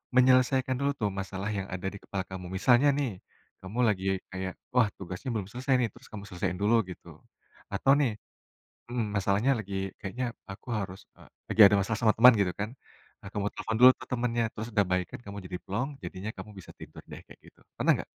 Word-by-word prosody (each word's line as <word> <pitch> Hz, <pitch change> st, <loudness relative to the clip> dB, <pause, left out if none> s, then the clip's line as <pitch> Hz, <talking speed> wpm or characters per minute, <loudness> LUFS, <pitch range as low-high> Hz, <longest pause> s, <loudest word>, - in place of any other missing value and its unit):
menyelesaikan 130 Hz, 0 st, +4 dB
dulu 140 Hz, 0 st, +1 dB
tuh 105 Hz, -3 st, +1 dB
masalah 95 Hz, +1 st, -4 dB
yang 95 Hz, 0 st, -3 dB
ada 90 Hz, +1 st, -3 dB
di -, -, -7 dB
kepala 95 Hz, -2 st, -3 dB
kamu? 95 Hz, -1 st, -6 dB
Misalnya 120 Hz, +7 st, +5 dB
nih, 140 Hz, -3 st, 0 dB, 0.5 s
kamu 95 Hz, +6 st, -6 dB
lagi 95 Hz, -3 st, 0 dB, 0.3 s
kayak, 95 Hz, 0 st, -4 dB, 0.2 s
"Wah, 125 Hz, -3 st, +5 dB
tugasnya 95 Hz, +7 st, -6 dB
belum 100 Hz, -4 st, -2 dB
selesai, 130 Hz, +3 st, -1 dB
nih." 120 Hz, -2 st, +1 dB
Terus -, -, -16 dB
kamu 105 Hz, -2 st, -7 dB
selesaiin 90 Hz, 0 st, -2 dB
dulu, 110 Hz, +3 st, +4 dB
gitu. 90 Hz, -, -10 dB, 0.7 s
Atau 135 Hz, -, +3 dB
nih 135 Hz, -5 st, +2 dB, 0.8 s
mhm, 120 Hz, -2 st, -1 dB
masalahnya 100 Hz, +6 st, +2 dB
lagi, 100 Hz, -2 st, -6 dB, 0.3 s
"Kayaknya 115 Hz, +5 st, -3 dB, 0.3 s
aku 95 Hz, -, -12 dB
harus, 95 Hz, -3 st, -3 dB, 0.2 s
eee." -, -, -17 dB, 0.2 s
Lagi 110 Hz, -, +4 dB
ada 100 Hz, +1 st, +6 dB
masalah 100 Hz, +3 st, 0 dB
sama 115 Hz, -, +4 dB
teman, 125 Hz, +3 st, +9 dB
gitu 95 Hz, -, +2 dB
kan. 100 Hz, +1 st, -2 dB, 0.5 s
Nah, 95 Hz, -, -9 dB
kamu 105 Hz, 0 st, -1 dB
telepon 110 Hz, -, -3 dB
dulu 125 Hz, +1 st, +10 dB
ke -, -, -7 dB
temennya 120 Hz, -1 st, 0 dB
terus 110 Hz, +1 st, -5 dB
udah 105 Hz, -, +4 dB
baikan, 90 Hz, -1 st, -1 dB
kamu 100 Hz, 0 st, -7 dB
jadi 90 Hz, -, -5 dB
plong, 115 Hz, +8 st, -2 dB
jadinya 95 Hz, +3 st, -5 dB
kamu 105 Hz, -, -8 dB
bisa 90 Hz, -, -12 dB
tidur -, -, -11 dB
deh -, -, -7 dB
kayak -, -, -14 dB
gitu, -, -, -19 dB, 0.2 s
pernah -, -, +3 dB
gak? -, -, -14 dB
105 Hz, 200 wpm, -29 LUFS, 95-125 Hz, 0.8 s, dulu